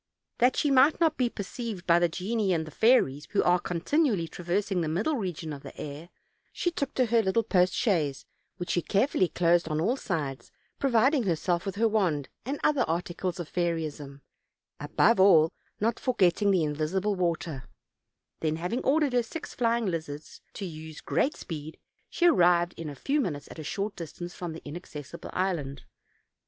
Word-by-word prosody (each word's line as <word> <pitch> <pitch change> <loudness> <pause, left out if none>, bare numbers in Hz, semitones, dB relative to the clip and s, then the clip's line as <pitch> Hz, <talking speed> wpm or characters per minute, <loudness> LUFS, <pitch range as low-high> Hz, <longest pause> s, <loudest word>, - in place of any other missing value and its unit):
That 250 +2 +4
she 290 - +1
might 275 +3 +5
not 325 -2 +3
be 250 -2 +1
per 205 - -5
ceived 215 -3 -6
by 170 0 +5
the 175 0 +2
genii 195 +3 -1
and 160 -3 -2
fairies, 150 - +3
who 205 - +3
are 180 0 +3
contin 285 - +1
ually 170 -6 -1
traversing 180 +2 -1
trie 160 - -1
middle 200 - 0
region 175 - -4
of 140 - -8
the - - -11
air, 150 +4 -7 0.4
she 350 - -1
took 280 -5 -3
to 255 - +3
her 230 0 +3
lit 190 -3 -1
tle 230 - +4
post 185 -4 +2
chaise, 155 - 0 0.3
which 175 -1 -4
she 175 - +1
carefully 200 - +2
closed 170 0 +2
on 155 -1 -1
all 220 +10 +1
sides, 155 - -4 0.3
providing 270 +2 +3
herself 175 0 0
with 195 - -3
her 225 +2 +3
wand 180 -10 0 0.2
and 280 +2 -2
other 290 -3 +3
articles 175 +2 -2
of 170 - -4
fairyism, 155 -5 -3 0.6
above 230 -2 +3
all 170 -4 +6 0.3
not 225 +2 0
forgetting 205 -5 +2
the 185 -4 +3
invisible 155 +7 -1
water; 165 -7 -2 0.7
then, 155 -1 0
having 180 +9 -2
ordered 290 -1 +2
her 245 - +4
six 270 +7 -7
fly 235 -1 +1
ing 235 - -2
lizards 155 -5 -5
to 200 - -5
use 155 -2 -8
'great 295 - 0
speed,, 155 -2 -7 0.3
she 350 - 0
ar 340 - +6
rived 175 -3 +4
in 160 -2 -6
a 145 - -7
few 285 - 0
minutes 150 - -4
at - - -10
a - - -5
short 195 +6 -3
distance 175 +1 -7
from 175 -3 -5
the 160 - -10
inaccessible 150 -3 -8
island. 165 -7 -2
180 Hz, 185 wpm, -28 LUFS, 160-225 Hz, 0.7 s, all